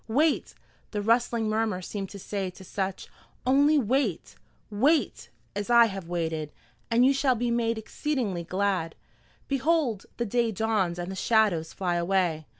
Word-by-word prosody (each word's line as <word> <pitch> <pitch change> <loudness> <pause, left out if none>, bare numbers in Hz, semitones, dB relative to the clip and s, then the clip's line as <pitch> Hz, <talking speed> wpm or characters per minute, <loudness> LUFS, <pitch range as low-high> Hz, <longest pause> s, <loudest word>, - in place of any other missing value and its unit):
"Wait," 295 +8 +1 0.3
the 210 - -3
rustling 230 0 +2
murmur 215 -3 0
seemed 195 +1 -5
to 200 - -9
say 195 0 -3
to 180 - -13
such; 190 0 -4 0.4
"only 285 +4 +4
wait 250 - 0 0.4
wait, 280 +10 +1 0.3
as 205 +2 -3
I 235 -1 +7
have 195 -5 -5
waited, 160 -3 -2 0.4
and 235 +2 +4
you 270 - +5
shall 270 -2 +2
be 240 +1 -1
made 230 -1 0
exceedingly 220 - -2
glad. 185 -2 -1 0.5
Behold, 275 - 0
the 235 - -1
day 235 +1 +1
dawns 205 -4 0
and 175 +1 -4
the - - -5
shadows 195 -6 +2
fly 175 -2 -1
away!" 170 -3 0
215 Hz, 150 wpm, -27 LUFS, 185-240 Hz, 0.5 s, I